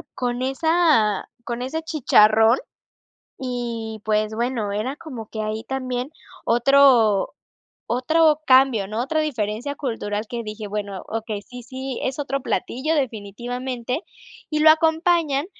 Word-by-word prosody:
con 245 Hz, 0 st, -2 dB
esa 270 Hz, -, +2 dB, 0.2 s
con 235 Hz, 0 st, -4 dB
ese 300 Hz, +6 st, -3 dB
chicharrón 225 Hz, -7 st, +4 dB, 0.9 s
y, 230 Hz, -3 st, -4 dB
pues 215 Hz, 0 st, +1 dB
bueno, 235 Hz, -3 st, -1 dB
era 225 Hz, +7 st, -2 dB
como 250 Hz, -10 st, -8 dB
que 220 Hz, -, -5 dB
ahí 215 Hz, +1 st, -3 dB
también 255 Hz, +1 st, -3 dB, 0.3 s
otro 240 Hz, -4 st, +4 dB, 0.5 s
otro 305 Hz, +5 st, +3 dB
cambio, 255 Hz, -7 st, +4 dB
¿no? 220 Hz, +3 st, -2 dB
Otra 310 Hz, +4 st, 0 dB
diferencia 245 Hz, -1 st, -2 dB
cultural 225 Hz, -6 st, -3 dB
que 235 Hz, -1 st, -4 dB
dije: 215 Hz, 0 st, -6 dB
"Bueno, 200 Hz, -2 st, -4 dB
okey, 220 Hz, -2 st, -4 dB
sí 245 Hz, +4 st, -11 dB
sí, 260 Hz, +1 st, -6 dB
es 265 Hz, +1 st, -2 dB
otro 275 Hz, -1 st, -2 dB
platillo, 260 Hz, +6 st, -1 dB
definitivamente", 245 Hz, -, -3 dB, 0.5 s
y 305 Hz, -1 st, 0 dB
lo 315 Hz, -, +8 dB
acompañan, 320 Hz, -2 st, +2 dB
245 Hz, 125 wpm, -22 LUFS, 220-280 Hz, 0.9 s, lo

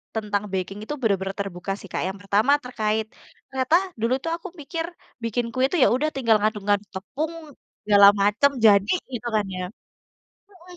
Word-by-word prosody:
tentang 210 Hz, -2 st, -1 dB
baking 190 Hz, +2 st, -3 dB
itu 230 Hz, -, -5 dB
bener-bener 195 Hz, -3 st, 0 dB
terbuka 195 Hz, -1 st, -5 dB
sih, 195 Hz, -, -12 dB
Kak. -, -, -1 dB
Yang 190 Hz, +1 st, -5 dB
pertama 205 Hz, +7 st, +2 dB
terkait 220 Hz, -3 st, -1 dB, 0.4 s
ternyata 265 Hz, +3 st, +1 dB, 0.3 s
dulu 235 Hz, +2 st, +2 dB
tuh 330 Hz, -, -2 dB
aku 350 Hz, -, -9 dB
mikir 330 Hz, +3 st, -4 dB, 0.4 s
bikin 230 Hz, +1 st, -1 dB
kue 255 Hz, 0 st, 0 dB
itu 360 Hz, -, -2 dB
ya -, -, +6 dB
udah 305 Hz, +4 st, 0 dB
tinggal 230 Hz, -5 st, +3 dB
ngaduk-ngaduk 205 Hz, -1 st, 0 dB
tepung 290 Hz, -, -4 dB, 0.5 s
segala 205 Hz, -1 st, +7 dB
macem 210 Hz, +8 st, +3 dB
jadi, 200 Hz, 0 st, +5 dB, 0.2 s
gitu 240 Hz, 0 st, -4 dB
kan 210 Hz, -1 st, +2 dB
ya? 185 Hz, -, -4 dB, 0.9 s
Mhm. 360 Hz, -2 st, -15 dB
215 Hz, 165 wpm, -24 LUFS, 200-265 Hz, 0.9 s, segala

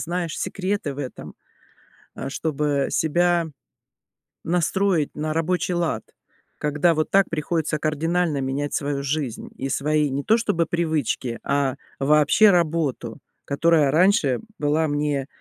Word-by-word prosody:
знаешь, 170 Hz, -1 st, -3 dB
секреты 190 Hz, -7 st, -2 dB
в -, -, -11 dB
этом, 130 Hz, -3 st, -7 dB, 0.8 s
э, -, -, -5 dB
чтобы 145 Hz, -2 st, -1 dB
себя 170 Hz, +1 st, +2 dB, 1.0 s
настроить 175 Hz, -1 st, +1 dB
на 155 Hz, +1 st, -2 dB
рабочий 180 Hz, +2 st, 0 dB
лад, 170 Hz, -2 st, -1 dB, 0.6 s
когда 150 Hz, +3 st, +2 dB
вот 155 Hz, -, -1 dB
так 195 Hz, 0 st, +4 dB
приходится 155 Hz, -1 st, -1 dB
кардинально 160 Hz, 0 st, 0 dB
менять 140 Hz, +2 st, -2 dB
свою 140 Hz, -1 st, -2 dB
жизнь 140 Hz, -4 st, -3 dB
и 135 Hz, -, -3 dB
свои, 150 Hz, +1 st, +1 dB
не 140 Hz, +1 st, -2 dB
то 225 Hz, -, +4 dB
чтобы 170 Hz, -7 st, 0 dB
привычки, 155 Hz, -8 st, -1 dB
а 140 Hz, -2 st, 0 dB, 0.2 s
вообще 150 Hz, +9 st, +5 dB
работу, 155 Hz, -8 st, 0 dB, 0.3 s
которая 150 Hz, -1 st, +3 dB
раньше 160 Hz, -7 st, +3 dB, 0.2 s
была 150 Hz, +2 st, +1 dB
мне, 145 Hz, -2 st, -1 dB
155 Hz, 125 wpm, -23 LUFS, 140-170 Hz, 1.0 s, вообще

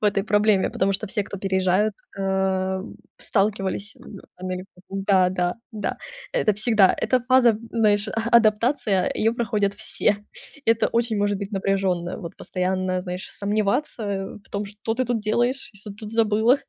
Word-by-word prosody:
в -, -, -3 dB
этой 200 Hz, -1 st, +2 dB
проблеме, 210 Hz, -1 st, +3 dB
потому 195 Hz, +1 st, +1 dB
что 215 Hz, +3 st, -2 dB
все, 205 Hz, +1 st, -1 dB
кто 200 Hz, -, -7 dB
переезжают, 190 Hz, +2 st, +1 dB, 0.2 s
э, 190 Hz, -1 st, 0 dB, 0.4 s
сталкивались 200 Hz, 0 st, -1 dB
в 200 Hz, -, -11 dB, 0.2 s
Америке 185 Hz, 0 st, -5 dB, 0.2 s
Да-да, 185 Hz, -2 st, +2 dB, 0.2 s
да, 215 Hz, -1 st, -3 dB, 0.4 s
это 215 Hz, -, +2 dB
всегда. 215 Hz, -3 st, +4 dB
Эта 255 Hz, -1 st, +2 dB
фаза, 245 Hz, -3 st, +4 dB
знаешь, 210 Hz, -2 st, +3 dB
а 225 Hz, +3 st, -2 dB
адаптация- 220 Hz, -2 st, +3 dB
ее 225 Hz, +1 st, +2 dB
проходят 215 Hz, -4 st, 0 dB
все. 205 Hz, -, 0 dB, 0.5 s
Это 225 Hz, 0 st, +3 dB
очень 230 Hz, -1 st, 0 dB
может 205 Hz, -1 st, +1 dB
быть 200 Hz, +1 st, -6 dB
напряженное, 190 Hz, -3 st, 0 dB
вот, 170 Hz, -, -8 dB
постоянно, 185 Hz, 0 st, -1 dB
знаешь, 180 Hz, 0 st, -6 dB
сомневаться 205 Hz, -1 st, -1 dB
в -, -, -22 dB
том, 200 Hz, 0 st, -3 dB
что 210 Hz, +2 st, -4 dB
ты 255 Hz, +2 st, 0 dB
тут 240 Hz, -3 st, 0 dB
делаешь, 240 Hz, +5 st, 0 dB
и 200 Hz, -, -18 dB
что 210 Hz, -, -11 dB
ты 200 Hz, -, -10 dB
тут 215 Hz, 0 st, -9 dB
забыла. 225 Hz, +3 st, +3 dB
205 Hz, 160 wpm, -24 LUFS, 190-220 Hz, 0.5 s, всегда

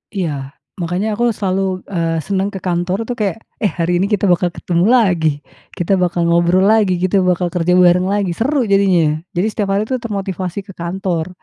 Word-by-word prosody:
Iya, 145 Hz, -7 st, -3 dB, 0.2 s
makanya 180 Hz, +4 st, -2 dB
aku 235 Hz, -, -1 dB
selalu, 190 Hz, -1 st, -1 dB
eee, 165 Hz, -3 st, -1 dB
senang 195 Hz, 0 st, 0 dB
ke 195 Hz, -, -5 dB
kantor, 180 Hz, +1 st, -1 dB
tuh, 245 Hz, +2 st, -4 dB
kayak, 210 Hz, 0 st, -1 dB, 0.3 s
"Eh, -, -, +4 dB
hari 170 Hz, +1 st, +1 dB
ini 195 Hz, -, +1 dB
kita 205 Hz, -1 st, -1 dB
bakal 175 Hz, 0 st, +2 dB
ketemu 175 Hz, +1 st, 0 dB
lagi. 180 Hz, -9 st, +2 dB, 0.5 s
Kita 175 Hz, +1 st, 0 dB
bakal 175 Hz, -1 st, 0 dB
ngobrol 170 Hz, +2 st, +3 dB
lagi, 210 Hz, -2 st, +4 dB
kita 185 Hz, +1 st, +2 dB
bakal 180 Hz, -1 st, +1 dB
kerja 180 Hz, +1 st, +1 dB
bareng 180 Hz, 0 st, +4 dB
lagi." 200 Hz, -2 st, 0 dB
Seru 260 Hz, -, 0 dB
jadinya 195 Hz, -3 st, +4 dB
ya, -, -, -1 dB, 0.2 s
jadi 185 Hz, +5 st, +1 dB
setiap 205 Hz, -1 st, -2 dB
hari, 205 Hz, -, +1 dB
tuh, 255 Hz, -, 0 dB
termotivasi 195 Hz, -4 st, -4 dB
ke 195 Hz, -, -12 dB
kantor. 175 Hz, -1 st, -3 dB
185 Hz, 190 wpm, -17 LUFS, 175-200 Hz, 0.5 s, Eh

